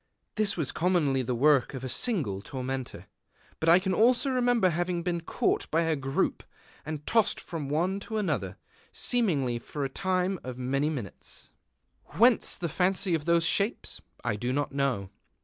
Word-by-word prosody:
This 210 -3 0
was 155 -5 0
commonly 160 -7 +1
the 125 0 -2
work 140 +1 +3
of 130 - -6
a - - -3
single 135 - 0
tormentor; 130 +2 -5 0.5
but 160 - +1
I 170 - +8
can 190 0 -1
also 245 +6 +3
remember 245 -6 +3
having 175 +1 -1
been 175 -1 -1
caught - - -1
by 165 - +2
a 165 -1 +1
group, 135 -1 -1 0.4
and 150 -1 -6
tossed 225 -2 +2
from 160 -4 -6
one 175 +7 0
to 220 +2 -5
another, 210 -3 -2 0.3
seemingly 150 - +1
for 145 +4 -5
a - - -3
time 185 +3 -1
of 125 -1 -6
many 135 +4 0
minutes. 125 - -6 0.6
III - - -9
Whence 235 0 +5
the 175 - -3
fancy 185 +3 +1
of 155 -2 -1
those 170 0 +3
shapes? 200 +7 -1 0.2
I 120 -3 0
do 120 +4 -2
not 145 +2 -1
know. 135 -9 -1
160 Hz, 170 wpm, -28 LUFS, 135-190 Hz, 0.6 s, I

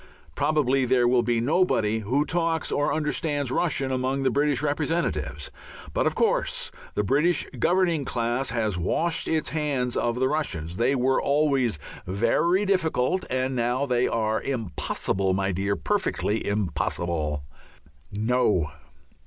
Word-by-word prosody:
Probably 140 - +2
there 125 -1 +3
will 125 0 +4
be 120 0 +1
nobody 115 - +2
who 130 +8 0
talks 165 -1 -1
or 145 +1 +1
understands 150 -2 -1
Russian 135 -4 0
among 130 +1 -1
the 130 - +2
British 145 -1 +1
representatives. 160 - -1 0.4
But, - - +1
of - - -1
course, - - 0 0.2
the 105 - +1
British 150 - +2
governing 170 +1 +2
class 120 +1 -1
has 110 -6 -1
washed 165 - 0
its 160 -1 0
hands 140 -6 -1
of 120 +1 0
the 130 - +3
Russians. 90 - -2
They 120 +5 +2
were 130 +1 +2
always 140 - +2 0.3
very 120 - +2
difficult, 185 -4 +1
and 130 +1 -1
now 120 +3 0
they 125 -2 +1
are 110 -1 0
"impossible, 95 -5 -1
my 95 0 0
dear, 100 +2 -1
perfectly 190 - -1
impossible." 85 -7 -1 0.7
No! 105 -7 +1
130 Hz, 135 wpm, -25 LUFS, 110-155 Hz, 0.7 s, will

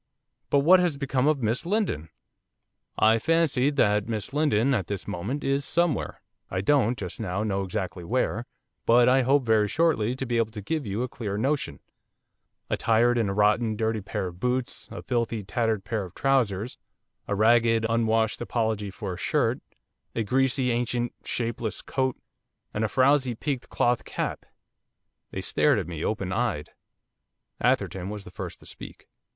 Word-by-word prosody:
'But 140 - +4
what 180 +6 +7
has 175 -5 +1
become 135 -1 0
of 150 -5 +2
Miss 115 +4 0
Lindon?' 175 - -1 0.9
'I 110 +1 +5
fancy 150 -1 +2
that 105 -8 +2
Miss 110 +2 -4
Lindon, 140 -4 +2
at 95 -8 0
this 100 -2 -4
moment, 105 +9 -3
is 140 +1 +1
somewhere; 170 +1 0 0.3
I 95 - -1
don't, 125 0 +2
just 90 -3 -6
now, 100 -1 -2
know 100 -2 -1
exactly 95 -1 -4
where, 120 +3 -1 0.4
but 120 +1 +6
I 130 +1 +5
hope 135 +2 +3
very 110 -2 +3
shortly 130 -5 +1
to 135 - -4
be 120 -1 0
able 115 -1 +1
to 105 - -6
give 155 0 -2
you 100 +5 -1
a - - -1
clearer 105 -5 -4
notion, 140 +6 -1 0.9
attired 120 +2 +2
in 110 -4 +1
a - - -1
rotten, 105 +2 +3
dirty 110 0 -1
pair 95 - -3
of 90 -1 -7
boots; 125 +2 -2
a - - -7
filthy, 115 -3 -1
tattered 110 0 -1
pair 110 -3 -2
of 90 - -13
trousers; 120 -5 0 0.5
a 100 - 0
ragged, 115 +1 +4
unwashed 115 -1 +1
apology 110 -4 -1
for 95 0 -5
a - - -7
shirt; - - +1 0.6
a 115 - 0
greasy, 130 +2 +1
ancient, 120 0 -1
shapeless 115 -2 -3
coat; 130 -1 -1 0.6
and 105 - -1
a - - +2
frowsy 130 +1 +3
peaked 135 +2 -3
cloth 120 -1 +1
cap.' - - -4 0.8
They - - -5
stared - - +2
at - - -1
me, 85 -3 -5
opened 100 -3 -2
eyed. 100 -9 -1 0.9
Atherton 95 0 0
was 105 -1 -6
the - - -12
first - - -7
to - - -15
speak. - - -10
115 Hz, 170 wpm, -26 LUFS, 105-130 Hz, 0.9 s, what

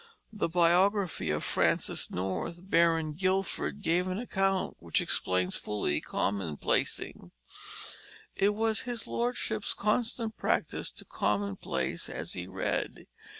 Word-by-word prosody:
The 205 -5 0
biography 180 +3 +3
of - - 0
Francis - - +1
North, 95 - -3
Baron 165 -2 +4
Guildford, 190 +3 0
gave 175 +3 +2
an 185 0 -1
account 195 -4 0
which - - +1
explains 90 0 0
fully 100 -8 -1
commonplacing: 95 -7 0 1.1
"It 205 +1 +3
was 220 0 +2
his 235 -2 -3
lordship's 235 -3 -1
constant 225 +1 0
practice - - 0
to - - -9
commonplace 100 -1 -1
as - - -4
he 90 0 -5
read. 95 0 -2
180 Hz, 110 wpm, -30 LUFS, -, 1.1 s, Baron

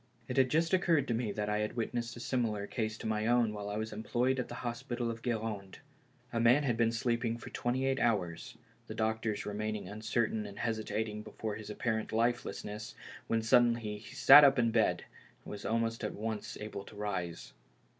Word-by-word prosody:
It - - -3
had 130 -1 +5
just 165 +5 +1
occurred 165 -6 +3
to - - +2
me 115 -2 -1
that 105 0 -3
I 105 0 0
had 105 0 -2
witnessed 115 0 -2
a - - -7
case - - -6
similar 110 -5 0
to 110 0 -3
my 110 0 0
own 120 -2 +3
while 105 -1 -5
I 105 - -3
was 110 +1 -3
employed 120 +4 0
at 125 - -2
the - - -7
hospital 120 0 -2
of 115 0 -8
Gud 120 -2 0
rande. 100 -4 -5 0.6
A 115 - +1
man 120 +5 +5
had 125 -4 +1
been 115 0 +2
sleeping 115 0 0
for - - -10
twenty 125 +2 -1
eight 135 0 +1
hours; 95 -8 -1 0.3
the - - -6
doctors 110 -1 -1
remaining 105 -1 -3
uncertain 110 +1 -1
and 100 - -10
hesitating 110 -1 -2
before 110 0 -5
his 105 0 -8
apparent 110 +1 -2
lifelessness, 110 -2 -2 0.3
when 115 -1 +1
suddenly 115 -3 +3
he 105 0 -12
sat 150 - +10
up 140 -1 +6
in 115 -2 +3
bed, 110 -1 +2 0.4
and - - -8
was 105 - -7
almost 115 +2 0
at 105 - -3
once 110 0 -4
able 105 -2 -6
to - - -13
rise. 95 -5 -4
110 Hz, 200 wpm, -32 LUFS, 105-120 Hz, 0.6 s, sat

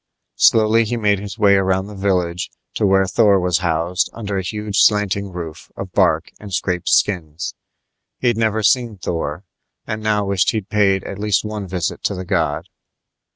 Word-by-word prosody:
Slowly 110 +1 +5
he 120 +2 -2
made 105 -3 +2
his 100 +1 -7
way 105 -3 +5
around 95 0 +1
the 105 - -10
village 90 -3 -1 0.2
to 105 - +1
where 95 0 +4
Thor 100 0 +3
was 90 -1 +1
housed 85 +1 0
under 105 -3 -5
a 95 - 0
huge 105 +2 -3
slanting 100 -2 +2
roof 85 -3 -8
of - - -6
bark - - +2
and 105 -1 -10
scraped 90 -2 -1
skins. 85 -4 0 0.6
He'd 120 -2 +1
never 110 -1 0
seen 115 0 +2
Thor, 85 -1 -3 0.4
and 110 0 -4
now 105 -1 +1
wished 100 -3 +1
he'd 110 -3 -3
paid 100 -3 +2
at 100 - -7
least 105 0 +1
one 105 -2 -5
visit 90 -2 -3
to 100 - 0
the 90 0 -6
god. 80 -6 -1
100 Hz, 175 wpm, -19 LUFS, 90-105 Hz, 0.6 s, Slowly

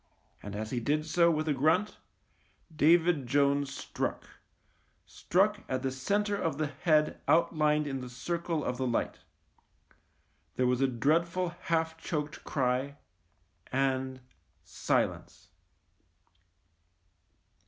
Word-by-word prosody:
And 100 0 -7
as 110 +1 -4
he 125 - -1
did 150 +5 0
so 170 +2 +3
with 155 -1 0
a 150 - +2
grunt, 160 +10 +1 0.8
David 160 -2 +4
Jones 140 +1 +2
struck - - -4 0.5
— - - -41
struck 205 +4 +1
at 130 0 -2
the 135 - 0
centre 205 +11 0
of 165 -6 -2
the 155 - 0
head 150 +1 +1
outlined 155 -2 +3
in 135 -2 -3
the 125 - -7
circle 165 +5 -3
of 125 0 -3
light. 125 -3 -1 1.4
There 125 - +1
was 125 +1 +1
a 135 - +4
dreadful 165 +8 +1
half 160 -2 -2
choked 150 -2 -4
cry 135 +1 -1 0.7
and 130 -1 -1 0.3
— - - -41
silence. - - -2
150 Hz, 120 wpm, -30 LUFS, 130-165 Hz, 1.4 s, David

